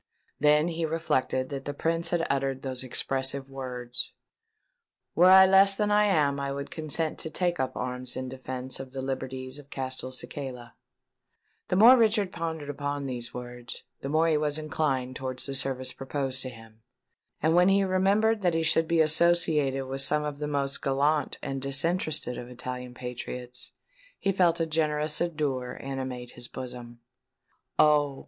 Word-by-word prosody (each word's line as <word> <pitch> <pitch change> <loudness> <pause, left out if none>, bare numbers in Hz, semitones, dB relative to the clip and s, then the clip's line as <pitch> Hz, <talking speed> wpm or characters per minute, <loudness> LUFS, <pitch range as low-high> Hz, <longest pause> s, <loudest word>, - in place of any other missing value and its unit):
Then 150 +3 +4
he 165 0 -3
reflected 155 -5 0
that 135 -1 -5
the 145 - -4
Prince 165 +2 0
had 170 -1 0
uttered 135 -1 -1
those 130 -2 -2
expressive 135 +1 -1
words, 125 -2 -4 1.0
"Were 180 +3 +6
I 190 0 +9
less 195 +1 +6
than 210 0 0
I 210 0 +5
am, 150 -8 +2
I 140 0 -2
would 140 0 -5
consent 155 0 -2
to 160 - -3
take 175 +2 0
up 130 - -2
arms 125 0 -3
in 130 - -3
defence 130 0 -5
of 130 -1 -8
the 135 - -4
liberties 130 0 -4
of 140 -1 -15
Castelcicala." 130 -1 -5 0.9
The - - 0
more 230 +7 +9
Richard 215 -5 +2
pondered 160 -3 -4
upon 145 0 -3
these 120 -3 -5
words, 120 -1 -8 0.2
the 135 - -4
more 155 0 +3
was 150 -1 0
he 155 - -4
inclined 135 -5 -1
towards 130 -1 -4
the 140 - -4
service 130 -1 -1
proposed 135 0 -3
to 130 - -4
him; 115 -2 -15 0.6
and 160 +2 +2
when 180 +2 +5
he 195 0 +4
remembered 200 +4 +2
that 175 -3 +2
he 165 - +1
should 165 0 +3
be 165 -1 +3
associated 155 -4 +3
with 135 +1 -3
some 150 +2 +3
of 145 -1 -4
the 150 - -2
most 140 -1 -1
gallant 145 +2 +1
and 135 -1 -3
disinterested 145 -1 0
of 120 - -8
Italian 125 0 -6
patriots, 125 0 -6 0.5
he 195 - 0
felt 175 -3 +3
a 165 - +2
generous 155 -1 0
ardour 145 -7 -2
animate 130 -2 -5
his 120 0 -8
bosom. 120 -2 -8 0.8
"Oh! 145 -2 +4
140 Hz, 165 wpm, -28 LUFS, 130-160 Hz, 1.0 s, I